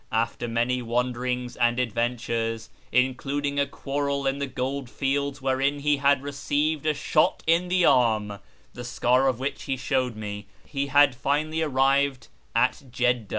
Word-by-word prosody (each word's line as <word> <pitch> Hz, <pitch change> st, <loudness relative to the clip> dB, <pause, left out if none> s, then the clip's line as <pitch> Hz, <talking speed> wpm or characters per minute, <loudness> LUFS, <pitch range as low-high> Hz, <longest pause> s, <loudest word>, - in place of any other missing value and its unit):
After 115 Hz, +1 st, -1 dB
many 120 Hz, +2 st, 0 dB
wanderings 125 Hz, +1 st, -2 dB
and 120 Hz, 0 st, +2 dB
adventures, 115 Hz, -1 st, -2 dB, 0.2 s
including 140 Hz, +3 st, 0 dB
a 140 Hz, -, +2 dB
quarrel 140 Hz, 0 st, -2 dB
in 135 Hz, +1 st, 0 dB
the 140 Hz, -, -2 dB
gold 130 Hz, 0 st, -3 dB
fields 140 Hz, +1 st, -2 dB
wherein 135 Hz, +2 st, 0 dB
he 150 Hz, 0 st, +2 dB
had 140 Hz, 0 st, +3 dB
received 145 Hz, +2 st, -1 dB
a 155 Hz, -, +3 dB
shot 155 Hz, +1 st, +1 dB
in 170 Hz, +2 st, +3 dB
the 180 Hz, -1 st, +2 dB
arm 110 Hz, -5 st, +2 dB, 0.3 s
(the 125 Hz, -, -7 dB
scar 125 Hz, +2 st, +2 dB
of 130 Hz, -3 st, +1 dB
which 135 Hz, +3 st, -4 dB
he 135 Hz, -1 st, -2 dB
showed 130 Hz, -3 st, -1 dB
me), 105 Hz, -1 st, -6 dB, 0.2 s
he 140 Hz, -1 st, -3 dB
had 145 Hz, -1 st, +5 dB
finally 150 Hz, +6 st, -1 dB
arrived 135 Hz, -2 st, +1 dB, 0.3 s
at -, -, +2 dB
Jedda. 125 Hz, -3 st, 0 dB
130 Hz, 150 wpm, -25 LUFS, 120-140 Hz, 0.3 s, had